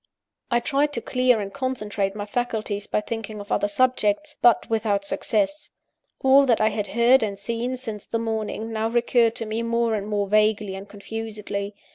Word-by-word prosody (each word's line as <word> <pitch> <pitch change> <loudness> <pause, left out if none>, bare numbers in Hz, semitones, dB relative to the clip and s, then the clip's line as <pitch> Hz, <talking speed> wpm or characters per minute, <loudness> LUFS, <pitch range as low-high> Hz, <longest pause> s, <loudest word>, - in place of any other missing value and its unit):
I 240 -1 +3
tried 290 +3 +1
to 235 - -1
clear 250 0 +2
and 195 -1 -5
concentrate 210 -7 -2
my 205 -1 -4
faculties 215 -3 -2
by - - 0
thinking 220 -1 -5
of 205 - -9
other - - +2
subjects; 255 +5 +1
but 240 -1 +5
without 215 -3 0
success. 215 +9 -1 0.5
All 270 +1 +6
that 235 -3 +3
I 215 - +4
had 210 -1 -3
heard 240 +3 +6
and 205 -3 -2
seen 235 +5 -3
since 220 -5 -6
the 230 - -1
morning, 225 0 -3
now 220 0 0
recurred 235 -1 +2
to 225 - -4
me 220 +1 -2
more 230 0 +1
and 205 -1 -2
more 205 -1 0
vaguely 210 -1 +2
and 195 +1 -8
confusedly. 210 -1 -5
220 Hz, 180 wpm, -24 LUFS, 205-240 Hz, 0.5 s, All